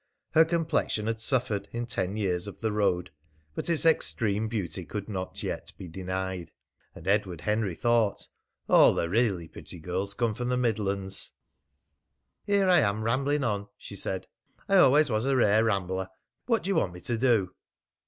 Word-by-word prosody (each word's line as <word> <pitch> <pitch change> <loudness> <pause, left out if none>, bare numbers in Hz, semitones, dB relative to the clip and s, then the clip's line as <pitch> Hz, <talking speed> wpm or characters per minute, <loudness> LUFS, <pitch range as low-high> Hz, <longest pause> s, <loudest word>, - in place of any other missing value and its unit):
Her 160 - +7
complexion 160 -9 0
had 115 0 -2
suffered 110 -5 0
in 120 +1 -3
ten 105 -4 -2
years 95 -3 -1
of 100 - -9
the 110 -1 -1
road, 90 -6 0 0.4
but - - -3
its 165 -1 +2
extreme 110 -9 +2
beauty 100 -5 -3
could 100 +3 -6
not 95 -3 -5
yet - - -4
be 95 - -8
denied. 95 0 -4 0.5
And - - -11
Edward 95 -5 +1
Henry 105 -1 0
thought: 115 -2 +1 0.4
"All - - +6
the 85 - 0
really 100 -4 +1
pretty 90 - -9
girls 90 +4 -3
come 115 -3 0
from 125 +3 -3
the 125 - +1
Midlands!" 100 -5 0 1.1
"Here 200 -1 +3
I 180 -2 +6
am 110 -4 +1
rambling 140 +5 +1
on," 105 -4 -1
she 100 - -10
said. 95 -1 -3 0.4
"I 195 - +4
always 150 -4 +5
was 110 +4 +1
a 135 - +2
rare 110 -2 +4
rambler. 95 -3 -1 0.4
What 230 -2 +2
do 190 - -3
you 195 - +1
want 90 - 0
me 90 - -10
to 120 - -1
do?" 115 -7 +2
105 Hz, 175 wpm, -28 LUFS, 95-125 Hz, 1.1 s, Her